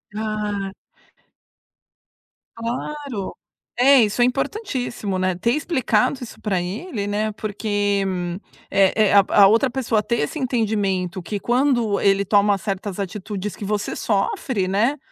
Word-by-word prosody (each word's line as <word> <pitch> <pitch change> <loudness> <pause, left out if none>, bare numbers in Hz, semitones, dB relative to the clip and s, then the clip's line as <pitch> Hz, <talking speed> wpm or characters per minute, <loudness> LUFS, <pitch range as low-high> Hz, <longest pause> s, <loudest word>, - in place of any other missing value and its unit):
Ah. 210 -2 -3 1.8
Claro. 245 -1 -4 0.4
É, 270 +1 +7
isso 215 +3 +1
é - - +6
importantíssimo, 250 - -2
né, 185 -1 +1
ter 230 +7 0
explicado 260 -4 +1
isso 235 - -11
pra 195 -4 0
ele, 205 - -4
né, 210 +1 -1
porque 205 -1 -1 0.7
é 195 +2 +4
é - - +2
a 200 -1 +7
a 200 -2 +7
outra 230 +6 +3
pessoa 240 -3 0
ter 225 +3 -1
esse 310 - -3
entendimento 205 - -1
que, 205 +4 -4
quando 240 -3 +1
ele 200 0 +3
toma 205 0 +3
certas 195 0 -4
atitudes 200 0 -4
que - - -9
você 205 +1 -2
sofre, 200 0 -1
né, 220 +10 +1
210 Hz, 130 wpm, -22 LUFS, 200-240 Hz, 1.8 s, É